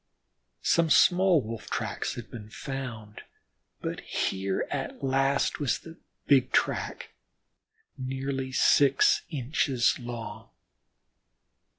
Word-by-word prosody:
Some 165 -1 +3
small 180 -1 +5
Wolf 115 0 -7
tracks - - -3
had 120 - -9
been 105 -3 -9
found, 120 -5 -7 0.6
but - - -4
here 95 0 -2
at - - -4
last 135 +1 +1
was 140 -5 +1
the 165 0 -12 0.3
big 135 -3 +4
track, - - -1 0.9
nearly 135 0 -3
six 135 +1 +4
inches 135 -3 +1
long. 120 -2 -7
135 Hz, 95 wpm, -28 LUFS, 120-140 Hz, 0.9 s, small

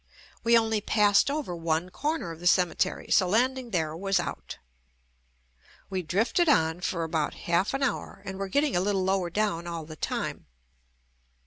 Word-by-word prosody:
We 235 0 +5
only 220 -2 +1
passed 205 +2 +3
over 280 - -3
one 165 +1 -1
corner 290 - -2
of 165 - -9
the 175 - -2
ceme 180 -1 +4
tery, - - -1
so 185 - +4
landing 250 +5 +1
there 160 -6 -1
was 195 +2 0
out. 175 - -5 1.3
We 190 -1 -1
drifted 225 - +1
on 160 - +2
for 170 -2 -1
about 160 -2 -1
half 175 +8 +1
an 275 - -1
hour 240 -6 -3
and 190 0 -6
were 195 -1 -3
getting 285 +3 +1
a 175 - +2
little 195 -1 0
lower 190 -2 0
down 175 -3 -1
all 165 -2 -5
the 155 0 -9
time. - - -4
190 Hz, 175 wpm, -27 LUFS, 170-225 Hz, 1.3 s, We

